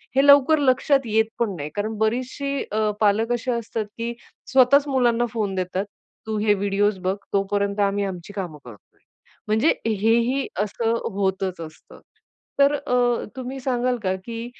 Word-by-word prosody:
हे 270 +1 +4
लवकर 285 +2 +6
लक्षात 275 +1 +3
येत 220 0 +2
पण 210 -5 0
नाही. 145 -2 -5
कारण 215 +1 -3
बरीचशी 255 +5 -1
अ, 215 0 +1
पालक 215 +3 +2
अशी 240 +1 -2
असतात, 230 -2 -3
की 235 +1 -3 0.4
स्वतःच 270 +3 +5
मुलांना 240 -3 +2
फोन 210 -4 -2
देतात, 185 +2 -2 0.4
"तू 220 -1 -2
हे 210 0 +3
व्हिडिओज 200 0 0
बघ, 185 +1 -1 0.2
तोपर्यंत 200 +1 0
आम्ही 200 0 +1
आमची 185 0 -7
कामं 180 -6 -5
करतोय." 115 -4 -12 0.7
म्हणजे 220 +8 +3 0.2
हेही 230 +5 +1 0.2
असं 225 +2 -1 0.2
होतच 190 -2 -1
असतं. 155 -1 -12 0.6
तर 280 +1 +5
अ, 245 -3 +1
तुम्ही 260 +1 -5
सांगाल 250 -1 0
का 190 -1 0
की 230 0 -5
220 Hz, 150 wpm, -23 LUFS, 200-250 Hz, 0.7 s, लवकर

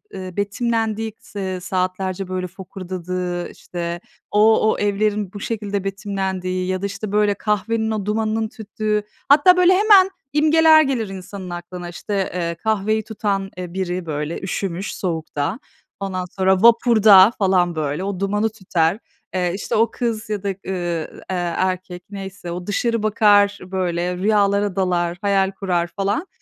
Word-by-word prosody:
ııı, 185 0 -7
betimlendiği, 225 +1 -1
s 205 - -10
eee, 185 -1 -3
saatlerce 185 +1 -2
böyle 185 0 -3
fokurdadığı, 180 -1 -5
işte, 170 0 -5 0.3
o 215 +1 +4
o - - -2
evlerin 205 -1 0
bu 205 - -7
şekilde 205 -2 -3
betimlendiği 190 -2 -3
ya 185 0 -1
da, - - -2
işte, 200 +1 -5
böyle, 210 0 +3
kahvenin 220 +2 -1
o 215 -3 -2
dumanının 220 +1 0
tüttüğü 215 -1 -2 0.3
hatta 335 +6 +7
böyle 360 +1 +6
hemen 390 -1 +6 0.2
imgeler 315 +1 +6
gelir 250 -8 -1
insanın 190 0 -8
aklına. 175 0 -7
İşte, 195 +2 -3
eee, 170 -1 -2
kahveyi 215 +3 0
tutan, 200 -3 -2
eee, 180 -1 -6
biri 185 -1 -2
böyle 150 +1 -3
üşümüş 190 0 -3
soğukta, 165 - -3 0.4
ondan 185 -2 -3
sonra 190 +1 +1
vapurda 225 -4 +7
falan, 185 -3 +2
böyle, 150 +2 -2
o 195 -2 -3
dumanı 210 +2 +1
tüter, 190 -3 0 0.4
eee, 180 -1 +1
işte, 195 - -3
o 225 +2 +3
kız 230 -3 -3
ya 210 -2 -3
da, 200 - -2 0.2
ııı, 175 -4 -3
eee, 175 -2 -1
erkek 185 -1 -2
neyse, 195 -3 -7
o 180 +1 -6
dışarı 230 +2 0
bakar, 205 -2 +4
böyle, 180 -1 -2
rüyalara 200 0 +2
dalar, 175 -2 0
hayal 195 -1 +2
kurar 180 -3 -1
falan. 200 - -2
195 Hz, 150 wpm, -21 LUFS, 180-215 Hz, 0.4 s, hatta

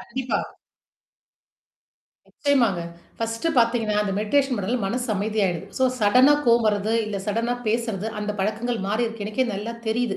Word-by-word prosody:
கண்டிப்பா. 255 +1 -2 1.9
நிச்சயமாங்க, 240 -11 +1 0.4
ஃபர்ஸ்ட்டு 225 +7 -2
பார்த்தீங்கன்னா, 230 -2 +2
அந்த 200 -2 -2
மெடிடேஷன் 265 +5 +1
பண்ணுறதுல 215 +4 -1
மனசு 245 +5 -2
அமைதிய 210 +1 0
ஆயிடுது. 175 0 -3
ஸோ 260 - +3 0.2
சடனா 250 +8 +6
கோவம் 235 -1 +4
வருறது, 210 +1 +1
இல்ல 210 - -3
சடனா 230 +3 0
பேசுறது, 220 -2 -1
அந்த 210 0 -2
பழக்கங்கள் 220 +4 -1
மாறிருக்கு. 225 0 -1
எனக்கே 215 +5 0
நல்லா 210 +4 -4
தெரியுது. 220 -2 0
225 Hz, 135 wpm, -24 LUFS, 210-240 Hz, 1.9 s, சடனா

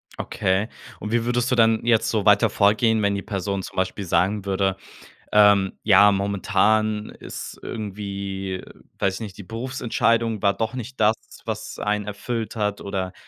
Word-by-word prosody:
Okay. 95 +3 -1 0.3
Und 105 +2 -5
wie 115 -1 +1
würdest 120 +1 0
du - - +4
dann 115 -1 +3
jetzt 115 -2 +3
so 110 -3 0
weiter 105 +1 +5
vorgehen, 105 +2 +3
wenn 100 0 +2
die 100 - -3
Person 100 0 -3
zum - - -10
Beispiel 95 +1 -2
sagen 100 +3 +1
würde, 95 -1 0 0.6
ähm: 100 -2 +5
„Ja, 105 0 +6
momentan 105 +2 +1
ist - - -9
irgendwie 100 -3 -5 0.4
weiß 95 -1 +1
ich - - -6
nicht, 100 -4 -7
die 100 - -8
Berufsentscheidung 115 -1 -1
war 100 0 +3
doch 110 +1 -2
nicht 130 0 -7
das, 110 +1 +5 0.3
was - - -5
einen 105 0 -1
erfüllt 110 +2 -4
hat 105 -2 -1
oder, 95 -2 -3
105 Hz, 165 wpm, -23 LUFS, 100-110 Hz, 0.6 s, Ja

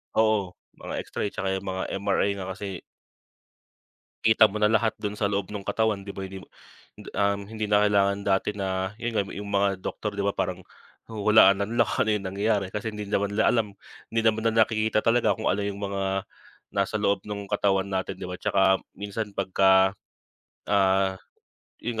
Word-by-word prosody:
Oo, 110 -4 +2 0.2
mga - - -8
X-ray 100 - -3
tsaka 95 0 -2
yung 95 - -4
mga 95 0 -3 0.2
MRI 100 0 +1
nga 95 -1 -5
kasi. 95 -1 -6 1.4
Kita 110 0 +6
mo 105 0 -2
na 105 - +5
lahat 110 0 +2
dun 105 0 -3
sa 105 - 0
loob 100 -1 -1
ng 105 -2 -6
katawan 110 -3 0
'di 100 - -6
ba, - - -7
hindi 95 0 -6
mo - - -13 0.5
hindi, - - -11
um, 100 0 +2
hindi 110 -1 -3
na 105 0 +3
kailangan 100 -1 +2
dati 100 +1 +1
na, 95 -1 -2
'yun 120 - -1
nga 100 - +1
yung 100 0 -6
mga 100 0 +2
doktor 105 +2 -4
'di 100 - -3
ba, 100 - +1
parang 95 -2 -2 0.5
huhulaan 105 -2 +5
na 100 - 0
nila 115 +3 +1
kung - - +1
ano - - 0
yung 100 -2 -2
nangyayari 100 0 0
kasi 105 +2 -4
hindi 105 -1 -6
naman 100 0 0
nila 110 +2 +3
alam, 110 -4 0 0.4
hindi 115 - +2
naman 110 0 +1
na 115 0 +4
nakikita 110 -1 +1
talaga 115 +1 +3
kung 110 - -2
ano 100 +2 0
yung 100 0 -4
mga 95 -1 -1 0.5
nasa 100 +2 -1
loob 100 -2 +1
ng 100 -1 -6
katawan 100 -1 +1
natin 95 -1 -2
'di - - -5
ba? 90 - -5
'Tsaka 95 - +1 0.3
minsan 105 +1 -5
'pagka, 95 0 +3 0.7
ah, 95 -1 +2 0.6
'yun 115 -1 -2
100 Hz, 190 wpm, -26 LUFS, 95-105 Hz, 1.4 s, Kita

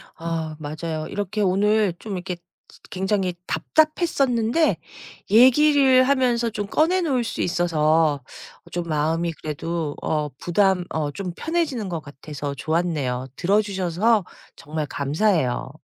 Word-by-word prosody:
아 165 -1 -4
맞아요. 155 +1 -4
이렇게 205 +1 -3
오늘 205 +1 +2
좀 215 - -6
이렇게 180 -1 -4
쯔 175 +1 -24
굉장히 190 -1 -1
답답했었는데 305 -4 +1 0.5
얘기를 260 +2 +6
하면서 250 -3 +2
좀 205 -1 -4
꺼내 335 - +2
놓을 265 -8 +1
수 - - -3
있어서 160 -4 +2 0.5
좀 175 -1 -3
마음이 160 +2 0
그래도 155 0 -3
어 150 -1 -1
부담 180 0 +2
어 150 -2 -1
좀 185 +1 -5
편해지는 305 - -2
것 170 -2 -3
같아서 145 0 -7
좋았네요. 145 -5 -1
들어주셔서 200 +2 +1 0.3
정말 155 +1 -4
감사해요. 145 - 0
180 Hz, 275 characters per minute, -23 LUFS, 155-225 Hz, 0.5 s, 얘기를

